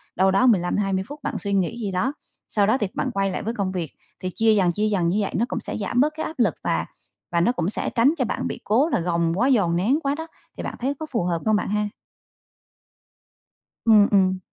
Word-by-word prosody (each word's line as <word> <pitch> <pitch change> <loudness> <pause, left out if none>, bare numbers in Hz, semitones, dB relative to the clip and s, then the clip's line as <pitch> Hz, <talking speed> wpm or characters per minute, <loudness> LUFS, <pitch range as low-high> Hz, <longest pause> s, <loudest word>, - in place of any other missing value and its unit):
đâu 190 +1 +3
đó 195 +7 +3
15-20 195 -2 +1
phút 290 +1 -9
bạn - - -2
suy 200 -1 -3
nghĩ 195 +3 0
gì 205 -3 -2
đó. 215 +10 0 0.4
Sau 205 -2 +2
đó 220 +5 +3
thì 210 - -1
bạn 260 - -1
quay 195 -3 0
lại - - -4
với 225 +2 -2
công 200 -5 -2
việc, 175 -5 -4 0.3
thì 185 - -3
chia 225 -1 +4
dần, 185 -4 +3
chia 210 +5 0
dần 190 -5 +1
như 180 +4 +1
vậy 195 - -2
nó 230 - +2
cũng - - -3
sẽ - - -5
giảm 220 +4 -1
bớt 300 +2 +2
cái 315 - -2
áp 315 - -7
lực, 210 -10 +2
và 80 0 0 0.5
và 170 - +2
nó 180 - +3
cũng 185 -8 -1
sẽ - - -2
tránh 250 +7 +3
cho 255 - +1
bạn - - -2
bị - - -5
cố 255 +10 +2
là - - +1
gồng 170 -1 0
quá, 250 - +3
dồn 200 -11 +3
nén 230 - +2
quá 280 0 0
đó. 320 +2 -6 0.3
Thì - - -5
bạn - - -4
thấy 265 +3 -1
có 315 - -4
phù 230 -8 0
hợp 170 -1 0
không 215 -1 +3
bạn 210 - -1
ha? 210 0 0 2.0
Ừm, 215 -2 +6
ừm. 190 -2 +3
205 Hz, 250 wpm, -23 LUFS, 185-240 Hz, 2.0 s, Ừm